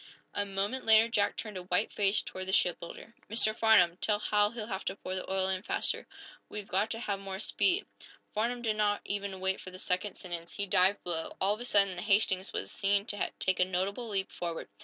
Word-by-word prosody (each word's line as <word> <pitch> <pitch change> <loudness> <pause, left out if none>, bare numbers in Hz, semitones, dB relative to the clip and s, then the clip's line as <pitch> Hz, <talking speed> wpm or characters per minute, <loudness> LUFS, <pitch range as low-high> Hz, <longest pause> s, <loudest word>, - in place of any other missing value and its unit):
A 205 0 -1
moment 200 +6 -2
later 220 0 +6
Jack 205 -3 +1
turned 215 -3 -5
a - - -4
white 180 +3 0
face 200 0 +2
toward 185 0 -6
the - - -1
shipbuilder. 180 +4 -1 0.2
"Mr. 215 0 +1
Farnum, 180 -7 +5
tell 210 +1 +1
Hal 210 0 +3
he'll 225 -1 -6
have 195 -3 -4
to 190 - -2
pour 185 -2 -6
the 185 0 -4
oil 190 0 +1
in 190 -1 -1
faster. - - -2 0.4
We've 210 -1 -6
got 200 +4 +1
to 225 - -3
have 200 -4 -2
more 195 -1 -5
speed." 365 - +1 0.5
Farnum 240 +3 -1
did 215 -2 0
not 205 -1 +2
even 200 -1 -3
wait 190 0 -1
for - - -8
the 185 - -10
second 185 +2 -1
sentence. 170 -2 -7
He 200 - -2
dived 190 +1 +3
below. 165 -2 -3
All 195 +2 +4
of 215 - -6
a - - -4
sudden 200 -5 +3
the - - -3
"Hastings" 195 -2 +2
was - - -4
seen 200 0 +2
to 205 -3 0
take 190 - +1
a - - +6
notable 195 +6 -2
leap 195 -2 -2
forward. 170 -2 -5
200 Hz, 220 wpm, -31 LUFS, 185-215 Hz, 0.5 s, later